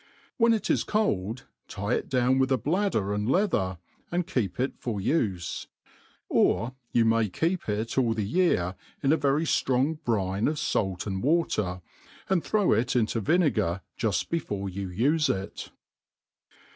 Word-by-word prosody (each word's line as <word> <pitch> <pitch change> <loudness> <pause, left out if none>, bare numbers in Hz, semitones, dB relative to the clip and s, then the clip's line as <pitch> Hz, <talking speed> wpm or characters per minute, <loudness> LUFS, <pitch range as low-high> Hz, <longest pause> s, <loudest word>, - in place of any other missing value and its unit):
When 230 -2 +4
it 225 -2 +1
is - - +2
cold, 125 - -1 0.2
tie 100 +4 -3
it - - -2
down 130 0 +2
with 130 0 +2
a 130 - +4
bladder 145 - 0
and 105 +2 -1
leather, 120 - +1 0.3
and 175 0 0
keep 125 - -2
it 130 +2 0
for 115 -5 -3
ufe. 95 - -1 0.7
Ox 120 +3 +2 0.2
you 115 -1 +3
may 115 -1 +3
keep 165 - -1
it 110 +5 -1
all 115 -3 +2
the 105 -2 -1
year 100 - +1 0.3
in 140 +2 +4
a - - +5
very 145 +1 +1
ftrong 145 +3 +1
brine 100 -4 0
of 150 - -1
fait - - +1 0.2
apd 95 -2 -3
water, 105 - 0 0.5
and 185 -4 +2
throw 210 -3 +2
it 120 +4 +1
into 115 -1 +1
vinegar 110 - +1
juft 105 -7 -1
before 105 -12 -2
you 95 0 -5
ufe 145 - +2
it. 95 +1 -3
120 Hz, 160 wpm, -27 LUFS, 100-155 Hz, 0.7 s, a